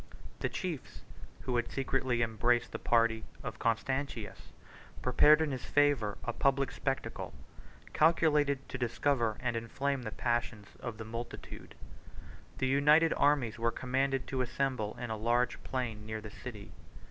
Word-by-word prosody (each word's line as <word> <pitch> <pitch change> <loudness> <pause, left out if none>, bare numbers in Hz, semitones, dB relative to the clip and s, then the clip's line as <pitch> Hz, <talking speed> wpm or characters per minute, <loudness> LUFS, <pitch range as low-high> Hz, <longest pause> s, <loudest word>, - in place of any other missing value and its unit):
The - - -1
chiefs, 170 -8 -5 0.4
who 125 - -2
had 120 - -1
secretly 130 -3 0
embraced 120 +2 +1
the - - -5
party 115 -1 +2 0.2
of 110 - -6
Constantius, 115 -1 -2 0.5
prepared 150 +5 +6
in 155 -2 0
his 130 -2 -4
favor 145 -8 +2
a 120 - -2
public 140 +1 +2
spectacle, 135 -1 -3 0.6
calculated 150 -4 +3
to 135 - -5
discover 120 -2 +1
and 120 -2 -1
inflame 135 +4 -1
the 115 - -4
passions 120 -3 -2
of 120 -3 -5
the 110 - -6
multitude. 115 +2 -7 0.8
77 - - -26
The 130 - +1
united 150 +4 +5
armies 140 -6 +2
were 115 0 +2
commanded 135 +2 0
to 130 -1 -2
assemble 125 -3 -1
in 120 -2 -4
a - - -1
large 120 +3 +1
plain 120 -5 -3
near 110 0 -3
the 105 -1 -9
city. 105 -3 -9
125 Hz, 145 wpm, -32 LUFS, 115-140 Hz, 0.8 s, prepared